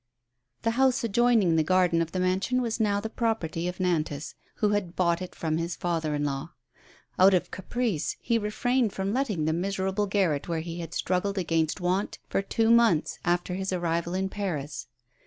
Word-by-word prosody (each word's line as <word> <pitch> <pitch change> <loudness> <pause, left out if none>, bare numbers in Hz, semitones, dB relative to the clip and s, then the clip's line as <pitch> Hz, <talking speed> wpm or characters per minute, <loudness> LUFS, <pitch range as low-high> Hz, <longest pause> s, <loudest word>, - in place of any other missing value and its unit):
T 230 - +2
he - - -5
house 265 -2 +3
adjoining 225 -6 +3
the 160 - +4
garden 180 0 +3
of 165 -1 -2
the 185 - -2
mansion 185 +7 +1
was 235 -2 -2
now 205 -2 +2
the 215 - -4
property 220 -8 -1
of 180 - -4
Nantas, 160 -5 -1 0.2
who 210 - +1
had 205 -4 -1
bought 170 -1 +1
it 185 - -7
from 160 -1 -1
his 170 +1 -2
father 165 -3 -1
in 145 - -1
law. 140 +3 -3 0.7
Out 190 +1 +7
of 180 - -1
caprice 205 -2 -2
he 230 -1 +1
refrained 225 +2 0
from 195 +1 -2
letting 225 - 0
the 160 - +1
miserable 190 +3 -1
garret 185 -8 +1
where 165 -2 -1
he 170 +1 -6
had 165 -1 -6
struggled 190 +2 0
against 165 -3 0
want 185 +3 -1
for - - 0
two 225 +3 +1
months 230 -9 +3
after 175 +1 0
his 190 +1 -2
arrival 170 -1 -1
in 190 +1 0
Paris. 175 -8 -4
185 Hz, 190 wpm, -27 LUFS, 165-210 Hz, 0.7 s, Out